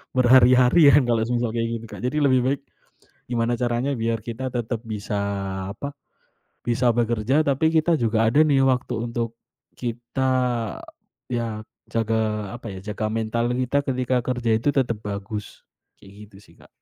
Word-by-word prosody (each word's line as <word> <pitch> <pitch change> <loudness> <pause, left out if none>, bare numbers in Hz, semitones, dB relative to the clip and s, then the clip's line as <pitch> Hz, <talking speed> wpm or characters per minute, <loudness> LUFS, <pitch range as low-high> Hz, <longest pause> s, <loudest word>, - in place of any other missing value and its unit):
berhari-hari 130 +4 +6
ya, - - +6
kalau 115 -2 +1
semisal 120 0 0
kayak 115 0 -1
gitu, - - -10
Kak. - - -9
Jadi 140 +4 -1
lebih 130 -3 +4
baik 135 +1 0 0.7
gimana 120 0 0
caranya 120 +3 0
biar 115 -1 -1
kita 120 +3 -4
tetap 120 -1 -2
bisa 105 -1 -3 0.6
apa, 140 +6 -5 0.8
bisa 120 +1 +2
bekerja 120 +4 +1
tapi 140 +3 +2
kita 165 +1 +3
juga 115 -1 +2
ada 145 +7 +3
nih 140 -3 +3
waktu 125 -1 0 0.2
untuk 115 -1 -3 0.4
kita 120 +2 -2 1.0
iya, 115 -2 -2 0.3
jaga 110 -2 -1
apa 120 - -12
ya, - - -7
jaga 110 - -2
mental 115 +2 -1
kita 130 +2 0
ketika 130 -1 0
kerja 125 -2 -1
itu 115 - -1
tetap 120 -5 +1
bagus, 100 +1 -6 0.4
kayak 95 - -15 0.2
gitu 100 - -18
sih, - - -21
Kak. - - -19
120 Hz, 155 wpm, -23 LUFS, 115-130 Hz, 1.0 s, berhari-hari